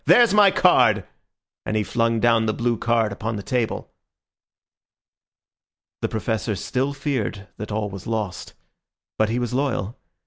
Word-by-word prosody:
There's 240 -4 +6
my 210 -1 +7
card," - - +4 0.6
and 110 - -2
he 105 - +1
flung 115 +1 0
down 115 -1 +3
the 110 - 0
blue 120 0 0
card 115 -2 +1
upon 110 +3 -4
the 100 - -5
table. 120 +2 -2 2.1
The - - -1
Professor 110 +1 -2
still 130 +9 -1
feared 135 -8 -3
that 105 0 -6
all 105 -1 -2
was 95 -1 -8
lost; 110 -5 -4 0.6
but 110 0 +3
he 115 - -1
was 125 0 -2
loyal. 125 -6 -2
115 Hz, 145 wpm, -23 LUFS, 105-125 Hz, 2.1 s, my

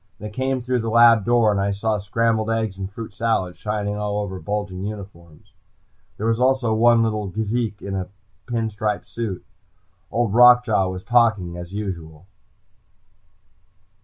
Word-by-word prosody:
They 105 +1 -8
came 130 +2 -2
through 125 0 0
the 115 0 -2
lab 115 -2 +6
door, 120 -2 +3
and 100 -1 0
I 100 0 0
saw 105 +1 -1
scrambled 110 +2 0
eggs 110 -3 -1
and 95 0 -6
fruit 110 +1 -8
salad 100 -5 -1
shining 105 -1 -3
all 105 0 -2
over 100 -2 -4
bulging 100 +1 -4
uniforms. 95 -6 -9 0.6
There 105 - -4
was 115 0 +1
also 130 -3 +2
one 115 +1 +4
little 110 -2 -1
geezik 110 +2 -2
in 100 - -5
a 95 -1 -4 0.4
pin 115 -2 -2
striped 105 -2 -3
suit. 110 -6 -5 0.6
Old 115 -3 0
Rock 125 +1 +7
Jaw 105 -5 +1
was 95 0 -6
talking, 105 -6 +2
as 90 0 -8
usual. 85 -6 -6
105 Hz, 160 wpm, -22 LUFS, 100-115 Hz, 0.6 s, Rock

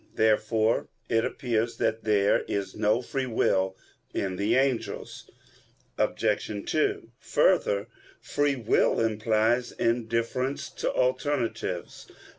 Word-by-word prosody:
Therefore 110 +1 +2 0.2
it 115 -1 +2
appears 115 -3 -1
that 110 0 -1
there 105 -2 +3
is 100 -1 -3
no 110 +3 +1
free 135 +1 -2
will 95 -5 +1 0.4
in 95 -2 -1
the 100 - +1
angels. 130 -2 -1 0.7
Obj. 105 -1 -1
2: 400 -1 0
Further, - - +2 0.3
free 145 -1 0
will 115 -4 +2
implies 110 +2 +1
indifference 115 +3 -1
to - - -2
alternatives. 125 -8 -1
115 Hz, 100 wpm, -27 LUFS, 110-130 Hz, 0.7 s, there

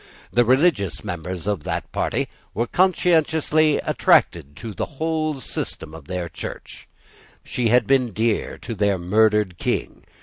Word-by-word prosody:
The 120 - +5
religious 130 - +2
members 90 +1 -5
of 100 -5 -1
that - - -4
party - - -1 0.3
were 115 +4 +1
conscientiously 160 -2 +2
attached 75 +2 +2
to 115 +3 -7
the - - -2
whole 155 -2 -1
system 80 -9 -5
of 80 -3 -11
their 90 -2 -3
Church. 85 - -9 0.6
She 120 -2 -1
had 120 0 +4
been 130 -2 +2
dear 110 +1 -1
to 115 - -4
their 100 -2 +1
murdered 105 0 +2
King. - - -2
115 Hz, 140 wpm, -22 LUFS, 95-150 Hz, 0.6 s, The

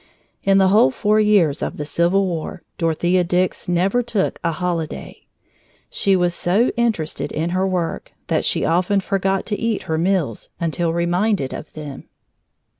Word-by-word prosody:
In 195 0 +4
the 190 -1 +5
whole 200 -8 +5
four 210 +10 +1
years 200 -9 +3
of - - -3
the 150 - -4
Civil 170 +6 +2
War, 170 -1 -4 0.2
Dorothea 175 +2 +2
Dix 180 +1 -1
never 190 +7 +2
took 225 -5 -1
a 170 - +1
holiday. 170 -2 -4 0.6
She 195 -1 +2
was 175 -1 +1
so 195 +8 +2
interested 225 -10 -1
in 165 +2 -2
her 185 +1 +1
work 180 -3 -2
that - - +1 0.2
often 180 +5 +2
she 190 - -8
forgot 195 -1 0
to 210 - -3
eat 230 -2 -1
her 160 0 -2
meals 170 - 0
until 170 0 -1
reminded 175 -1 0
of 155 - -8
them. 150 -3 -8
180 Hz, 160 wpm, -20 LUFS, 165-195 Hz, 0.6 s, the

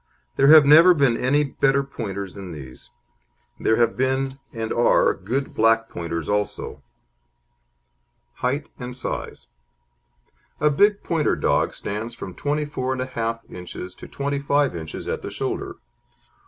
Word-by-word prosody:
There 135 - +4
have 155 -1 +9
never 165 +5 +8
been 135 -6 +3
any 140 +5 +2
better 140 0 +1
Pointers 100 -8 -6
than 95 -3 -8
these. 65 -4 -11 0.7
There 110 - +2
have 115 -1 +2
been, 130 +1 -1
and 115 -1 -3
are, 120 - +4
good 135 +2 -3
black 115 0 +3
Pointers 85 -2 -4
also. 105 0 -2 1.6
HEIGHT 140 +4 -2
AND 125 0 -6
SIZE - - -5 1.1
A 150 0 +3
big 205 +7 +3
Pointer 160 -3 +1
dog - - +1
stands 110 +3 -5
from 95 -5 -8
24 145 -2 -2
1/2 115 -3 -4
inches 90 0 -8
to - - -12
25 140 -2 0
inches 80 -2 -7
at - - -2
the - - -6
shoulder. - - -4
130 Hz, 130 wpm, -23 LUFS, 105-140 Hz, 1.6 s, have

